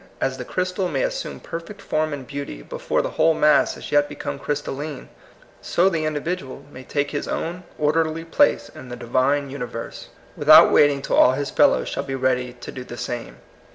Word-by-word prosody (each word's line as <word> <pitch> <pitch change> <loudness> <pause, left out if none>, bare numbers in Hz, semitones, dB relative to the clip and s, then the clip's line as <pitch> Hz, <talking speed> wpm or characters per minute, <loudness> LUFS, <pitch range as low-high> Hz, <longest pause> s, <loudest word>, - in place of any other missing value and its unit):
As 130 0 -1
the 125 - -5
crystal 185 +3 -1
may 180 - -1
as - - 0
sume - - -5
perfect 170 +5 -8
form 155 0 -1
and 140 -3 -5
beauty 140 - -6
before - - -2
the - - -3
whole 160 0 +3
mass 150 -1 +4
has - - -11
as - - -7
yet 145 0 +3
become 140 -1 -5
crystalline, 145 0 -4 0.5
so 185 +3 +2
the 165 -4 -1
individual 150 -3 -4
may 130 - -10
take 145 +2 -2
his 145 - -3
own 175 +2 -4
orderly 160 +2 0
place 285 - +2
in 130 - -12
the 125 - -5
Divine 130 +4 0
universe, 125 -4 -6 0.3
without - - +8
wait 145 - +7
ing 140 -1 -3
till - - 0
all 125 - +6
his 140 +1 -3
fellows - - +3
shall - - -2
be 135 - -4
ready 125 -1 0
to 120 - -9
do 130 - -7
the 120 -1 -9
same. 120 -1 -6
145 Hz, 200 wpm, -22 LUFS, 130-160 Hz, 0.5 s, without